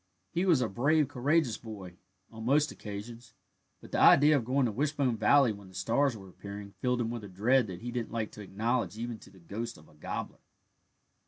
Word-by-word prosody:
He 175 +3 0
was 160 -8 +5
a 120 - +1
brave, 145 +8 +2
courageous 140 -1 +1
boy, 100 -6 -9 0.4
on 110 0 -9
most 145 +5 +3
occasions, 115 +3 -9 0.5
but - - -13
the - - 0
idea 150 +2 +7
of 135 - +1
going 130 +3 +1
to 115 - 0
Wishbone 140 0 0
Valley 120 +3 +5
when 100 -2 -10
the 95 - -16
stars 115 +7 +1
were 95 -2 -12
appearing 100 +2 -9
filled 125 0 +1
him 115 -1 -1
with 120 -2 -5
a 100 - -8
dread 115 +6 +2
that 90 -1 -7
he 120 +1 -5
didn't 120 -2 -3
like 110 -2 -2
to 105 - -10
acknowledge 105 0 -1
even 115 -1 -5
to - - -15
the 95 - -19
ghost 105 +7 -6
of 75 - -17
a - - -20
gobbler. 75 - -6
115 Hz, 215 wpm, -30 LUFS, 100-130 Hz, 0.5 s, idea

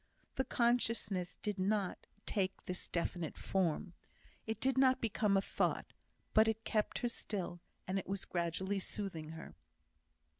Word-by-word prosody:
The 265 - 0
consciousness 230 -6 +1
did 205 -2 -1
not 195 0 0 0.2
take 195 -3 -1
this 180 0 -3
definite 170 -1 -2
form, 180 -2 0 0.5
it 220 - -2
did 265 -1 +2
not 260 -1 +5
become 210 -3 +2
a - - +4
thought, - - 0 0.4
but 220 +1 +7
it 220 0 0
kept 215 -1 +1
her - - +4
still, 190 -6 -3 0.3
and 190 +1 +1
it - - -7
was 195 0 -1
gradually 180 +3 0
soothing 185 -6 -3
her. 160 - -8
195 Hz, 145 wpm, -36 LUFS, 180-220 Hz, 0.5 s, but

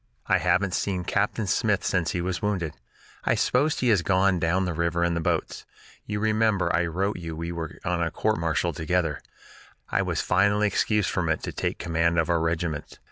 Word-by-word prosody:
"I 95 - +3
haven't 90 +2 +1
seen 95 -2 -1
Captain 105 +4 0
Smith 95 - +1
since 85 -2 +1
he 90 - -1
was 90 0 -2
wounded. 95 -7 -1 0.5
I - - +2
suppose 145 +4 +2
he 125 - +2
has 105 -6 +4
gone 95 0 +2
down 90 +3 +1
the 90 - -2
river 85 +1 0
in 85 0 +1
the 85 - -1
boats. - - -1 0.4
You 105 0 -2
remember 110 -4 +2
I 85 0 +1
wrote 95 +5 -1
you 80 -2 -6
we 85 +2 -4
were 85 -2 -5
on 90 -1 0
a 85 - +1
court 110 0 0
martial 85 +1 0
together; 80 0 -1 0.7
I - - +2
was - - -1
finally 100 +1 +2
excused 105 0 +1
from 90 -3 -1
it 80 - 0
to - - -3
take - - -2
command 85 0 0
of 80 +1 +2
our 85 - +2
regiment. 80 -2 -2
90 Hz, 200 wpm, -26 LUFS, 85-100 Hz, 0.7 s, has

